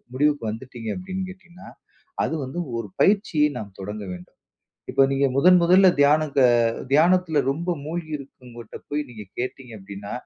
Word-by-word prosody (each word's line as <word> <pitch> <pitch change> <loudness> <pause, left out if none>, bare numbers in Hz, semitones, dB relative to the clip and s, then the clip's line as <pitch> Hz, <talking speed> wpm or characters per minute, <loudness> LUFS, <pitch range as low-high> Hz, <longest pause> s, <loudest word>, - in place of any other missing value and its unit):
முடிவுக்கு 145 +1 +1
வந்துடீங்க 115 0 -7
அப்டின் 185 +1 -5
கேட்டீங்கனா, 185 -1 -15 0.6
அது - - -2
வந்து 130 +7 -7 0.2
ஒரு 115 - -5
பயிற்சியை 175 -7 +3
நாம் 100 -3 -9
தொடங்கவேண்டும். 95 -3 -8 0.5
இப்ப 135 +1 +4
நீங்க 140 +1 +2
முதன் 180 +5 +6
முதல்ல 185 +2 +6
தியானத்த 145 0 +3 0.5
தியானத்துல 165 0 +4
ரொம்ப 170 +6 -3
மூழ்கி 160 0 -5
இருக்குறவங்கட்ட 125 -5 -12
போய் 150 +1 -1
நீங்க 110 -3 -9
கேட்டீங்க 125 -1 -5
அப்டின்னா, 100 +1 -9
145 Hz, 135 wpm, -23 LUFS, 120-170 Hz, 0.6 s, முதன்